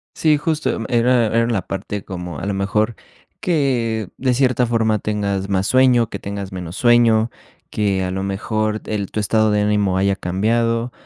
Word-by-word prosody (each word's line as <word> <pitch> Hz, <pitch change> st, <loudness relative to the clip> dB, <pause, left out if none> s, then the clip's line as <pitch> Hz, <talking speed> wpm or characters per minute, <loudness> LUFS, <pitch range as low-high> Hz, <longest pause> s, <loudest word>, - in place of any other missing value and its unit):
Sí, 155 Hz, -2 st, +3 dB
justo, 155 Hz, +1 st, -1 dB
mm, 115 Hz, -, -5 dB
era 120 Hz, 0 st, +3 dB
era 115 Hz, +1 st, +1 dB
la 115 Hz, -5 st, 0 dB
parte 100 Hz, +1 st, -5 dB
como, 90 Hz, -2 st, -6 dB
a -, -, -5 dB
lo 100 Hz, -, -1 dB
mejor, 105 Hz, +3 st, 0 dB, 0.4 s
que 120 Hz, -, 0 dB
de 130 Hz, -1 st, +1 dB
cierta 125 Hz, -1 st, +2 dB
forma 110 Hz, -2 st, +1 dB
tengas 100 Hz, -2 st, -2 dB
más 95 Hz, 0 st, 0 dB
sueño, 125 Hz, -3 st, +4 dB
que -, -, -6 dB
tengas 100 Hz, -1 st, -6 dB
menos 90 Hz, -2 st, -6 dB
sueño, 120 Hz, -1 st, +4 dB, 0.4 s
que 100 Hz, -3 st, 0 dB
a 90 Hz, -, -2 dB
lo 95 Hz, +1 st, -3 dB
mejor 110 Hz, +2 st, -2 dB
el 100 Hz, -3 st, -3 dB
tu -, -, -3 dB
estado 110 Hz, +1 st, +2 dB
de 105 Hz, 0 st, +2 dB
ánimo 105 Hz, -2 st, +1 dB
haya 100 Hz, +1 st, +2 dB
cambiado, 115 Hz, +6 st, 0 dB
110 Hz, 180 wpm, -20 LUFS, 100-120 Hz, 0.4 s, sueño